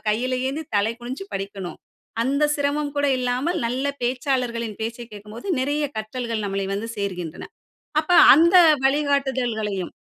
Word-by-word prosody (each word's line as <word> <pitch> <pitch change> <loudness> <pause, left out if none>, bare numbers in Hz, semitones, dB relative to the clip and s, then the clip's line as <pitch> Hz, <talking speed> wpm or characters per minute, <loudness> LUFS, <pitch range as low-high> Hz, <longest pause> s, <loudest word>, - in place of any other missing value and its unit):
கையில 250 +4 0
ஏந்தி 300 +4 -3
தலை 205 +3 +2
குனிஞ்சு 260 +10 -6
படிக்கணும், 195 -2 -5 0.4
அந்த 280 +4 +1
சிரமம் 285 0 -1
கூட 285 0 +2
இல்லாமல் 255 +7 -1
நல்ல 265 +4 -1
பேச்சாளர்களின் 245 -3 -1
பேச்சை 230 +2 -4
கேட்கும்போது 210 - -10
நிறைய 290 +2 0
கற்றல்கள் 225 0 -3
நம்மளை 195 0 -2
வந்து 220 +3 -4
சேர்கின்றன. 180 -5 -4 0.5
அப்ப 315 +3 -10 0.2
அந்த 340 +5 +5 0.3
வழிகாட்டுதல்களையும். 265 -9 0
245 Hz, 125 wpm, -23 LUFS, 215-280 Hz, 0.5 s, அந்த